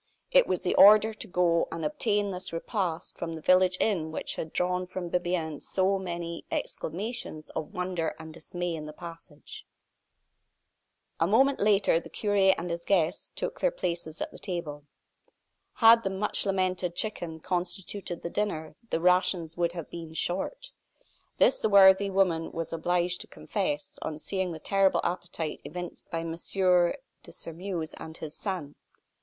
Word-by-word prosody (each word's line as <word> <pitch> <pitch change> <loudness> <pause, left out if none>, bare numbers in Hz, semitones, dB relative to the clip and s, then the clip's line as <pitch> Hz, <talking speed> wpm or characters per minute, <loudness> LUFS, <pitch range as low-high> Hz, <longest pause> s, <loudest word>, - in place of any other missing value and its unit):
It - - +6
was - - -1
the - - +1
order 215 +2 +8
to 220 - -4
go 175 -3 +2
and 165 -2 -4
obtain 205 +6 0
this 180 0 -5
repast 170 -1 -3
from 165 -1 -3
the - - -6
village 185 +2 +4
inn 170 -7 +1
which - - -2
had 160 - -5
drawn 180 0 0
from 180 -1 -5
Bibiaine 175 -4 -1
so 195 +1 +1
many 170 -2 -5
exclamations 180 -3 -4
of 155 - -5
wonder 180 -2 -2
and 160 -1 -10
dismay 175 +2 -4
in 155 -2 -5
the 150 - -8
passage. 165 -3 -10 1.6
A 165 - +3
moment 265 +7 +4
later 200 -5 +4
the - - -12
cure 205 -2 -2 0.2
and 175 +1 -4
his 170 0 -3
guests 170 -5 +1
took - - -4
their - - +3
places 170 - -3
at - - -7
the - - -11
table. 155 -6 -5 0.9
Had 230 0 +7
the 195 - -1
much 195 +1 -1
lamented 185 -2 0
chicken 175 -7 -3
constituted 180 +1 -3
the 170 - -4
dinner 160 -7 -2 0.2
the - - 0
rations 180 -2 +2
would 170 -1 0
have 170 -3 -7
been 165 -2 -8
"short." 345 - -2 0.7
This 260 - +4
the 220 - +1
worthy 195 0 +7
woman 185 -4 +1
was 165 0 -4
obliged 175 +2 0
to - - -9
confess, 165 -8 -3
on 155 - -4
seeing 190 +2 -2
the 165 - -5
terrible 195 +4 +2
appetite 175 -3 -3
evinced 175 +2 -7
by 165 - -2
M. 165 0 -4
de 180 +8 0
Sairmeuse 165 -1 -5
and 160 0 -8
his 155 -1 -7
son. 180 -8 -4
175 Hz, 160 wpm, -28 LUFS, 165-195 Hz, 1.6 s, order